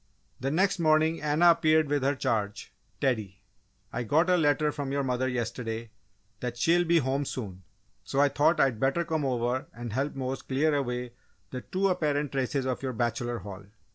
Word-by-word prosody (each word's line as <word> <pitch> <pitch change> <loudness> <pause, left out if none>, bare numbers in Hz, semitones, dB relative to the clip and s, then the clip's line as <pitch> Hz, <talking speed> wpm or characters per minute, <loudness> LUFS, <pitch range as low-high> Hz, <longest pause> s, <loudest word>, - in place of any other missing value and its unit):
The 135 - -1
next 185 +5 +1
morning 155 0 +3
Anna 150 +4 +5
appeared 155 -1 +3
with 145 0 0
her 140 +2 +1
charge, 110 -6 -2 0.3
Teddy. 105 -8 -1 0.5
"I 120 - -2
got 160 - +2
a - - +5
letter 150 -2 +2
from 145 -2 -4
your 140 0 0
mother 130 0 0
yesterday 115 -2 -4 0.5
that 120 0 -4
she'll 170 +7 +3
be 170 0 +4
home 135 -1 0
soon, 100 -9 -6 0.4
so 135 - -2
I 145 - +6
thought 150 +4 +2
I'd 130 -5 +2
better 140 +7 +1
come 160 -2 -1
over 125 -1 -1
and 120 -2 -7
help 135 +4 -1
Mose 130 0 -3
clear 145 +4 +1
away 125 -3 -2 0.4
the 125 - -5
too 190 +7 0
apparent 150 -6 0
traces 135 0 -1
of 130 -1 -2
your 130 -2 -3
'bachelor 120 +1 -1
hall. 100 -1 -9
135 Hz, 180 wpm, -28 LUFS, 120-155 Hz, 0.5 s, I